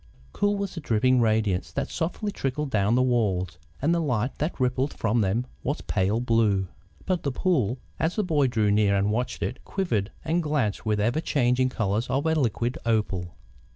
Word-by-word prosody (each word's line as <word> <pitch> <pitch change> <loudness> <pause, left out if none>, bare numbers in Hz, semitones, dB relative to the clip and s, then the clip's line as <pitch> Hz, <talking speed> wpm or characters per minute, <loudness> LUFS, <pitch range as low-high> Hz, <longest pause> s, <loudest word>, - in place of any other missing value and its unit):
Cool 205 0 +1
was 200 -1 -3
the 165 - -6
dripping 125 0 +3
radiance 110 -4 +1
that - - -3
softly 195 +5 -2
trickled 135 -2 -3
down 105 0 +2
the 125 - +4
walls, 95 -9 0 0.2
and 160 +4 +3
the 170 - +2
light 125 -4 0
that 150 0 -2
rippled 130 +2 0
from 115 +1 +1
them 105 +5 0 0.2
was 145 +4 -2
pale 100 +3 0
blue. 110 -5 +2 0.4
But 185 -3 0
the 140 - -1
pool, 130 - +1 0.2
as 160 +2 0
the 215 - +1
boy 150 -7 +2
drew 110 -4 +1
near 100 -1 +3
and 100 +1 +2
watched 125 +4 -2
it, 125 - -4
quivered 115 - -1
and 165 +2 +1
glanced 140 - -1
with 105 -1 +2
the 105 - 0
ever 120 +8 +1
changing 130 -4 +2
colours 110 -1 -1
of 135 +4 0
a 160 - +3
liquid 120 -4 0
opal. 100 -6 -1
120 Hz, 190 wpm, -26 LUFS, 105-150 Hz, 0.4 s, the